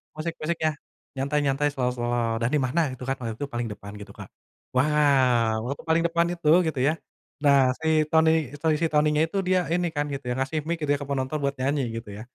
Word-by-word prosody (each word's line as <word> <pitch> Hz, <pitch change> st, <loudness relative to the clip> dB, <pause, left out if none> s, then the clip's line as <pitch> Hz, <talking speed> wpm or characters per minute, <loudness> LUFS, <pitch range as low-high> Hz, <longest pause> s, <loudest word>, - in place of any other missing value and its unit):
musik-musiknya, 160 Hz, 0 st, -2 dB, 0.5 s
nyantai-nyantai 140 Hz, +1 st, 0 dB
slow-slow 120 Hz, -2 st, -1 dB
dan 115 Hz, -, +1 dB
di 150 Hz, -, +3 dB
mana 150 Hz, +7 st, 0 dB
gitu 130 Hz, -, -9 dB
kan, 135 Hz, -, 0 dB
waktu 115 Hz, -2 st, -4 dB
itu 145 Hz, -, -2 dB
paling 120 Hz, -1 st, -2 dB
depan 100 Hz, 0 st, -11 dB
gitu, -, -, -10 dB
Kak. -, -, -9 dB, 0.5 s
Wow! 130 Hz, -5 st, +3 dB, 0.2 s
waktu 140 Hz, -, -6 dB
paling 165 Hz, +1 st, +3 dB
depan 170 Hz, 0 st, +1 dB
itu 170 Hz, -3 st, -5 dB, 0.2 s
gitu 150 Hz, -5 st, -2 dB
ya. 155 Hz, -, +3 dB, 0.5 s
Nah, 140 Hz, -1 st, +6 dB, 0.2 s
si 160 Hz, -, -3 dB, 0.2 s
Tony, 160 Hz, 0 st, +5 dB, 0.3 s
Tony 160 Hz, -1 st, +2 dB
si 165 Hz, -, +3 dB
Tonynya 150 Hz, 0 st, +3 dB
itu 195 Hz, -, -4 dB
dia 185 Hz, 0 st, +3 dB
ini 175 Hz, 0 st, +1 dB
kan 145 Hz, -, 0 dB
gitu 140 Hz, -1 st, -6 dB
ya, -, -, -1 dB
kasih 135 Hz, +4 st, -2 dB
mic 170 Hz, -, 0 dB
gitu 145 Hz, -, 0 dB
ya, 145 Hz, -, -1 dB
ke 140 Hz, -, -6 dB
penonton 135 Hz, +2 st, -1 dB
buat 140 Hz, 0 st, 0 dB
nyanyi 140 Hz, +2 st, 0 dB
gitu 115 Hz, -2 st, -7 dB
ya. -, -, -8 dB
145 Hz, 210 wpm, -25 LUFS, 125-155 Hz, 0.5 s, Nah